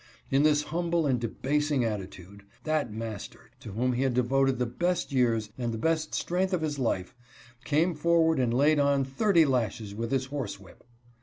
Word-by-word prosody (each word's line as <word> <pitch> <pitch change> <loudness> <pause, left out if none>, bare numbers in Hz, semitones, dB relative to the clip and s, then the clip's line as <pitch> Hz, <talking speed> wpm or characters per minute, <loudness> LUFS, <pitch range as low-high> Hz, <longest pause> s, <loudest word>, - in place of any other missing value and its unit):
In 135 - +4
this 150 -1 +3
humble 170 +1 -1
and 130 -4 +1
debasing 140 +3 0
attitude, 100 -2 -6 0.2
that 155 -6 -1
master, 110 -1 -7
to 105 - -9
whom 125 +4 0
he 125 - -1
had 135 -2 +1
devoted 135 +1 +2
the 125 - 0
best 175 +10 -1
years 115 -5 +1
and 120 -1 -1
the 115 - -4
best 155 +4 0
strength 185 +2 -1
of 170 -3 0
his 150 -2 -2
life, 110 -5 -1 0.5
came 160 +4 +2
forward 160 0 +2
and 125 -2 +1
laid 145 +5 +3
on 140 -1 +2
thirty 165 +5 +3
lashes 115 -5 -1
with 115 +2 -4
his 135 -1 +1
horse 135 -7 -5
whip. 95 - -17
135 Hz, 180 wpm, -28 LUFS, 115-155 Hz, 0.5 s, In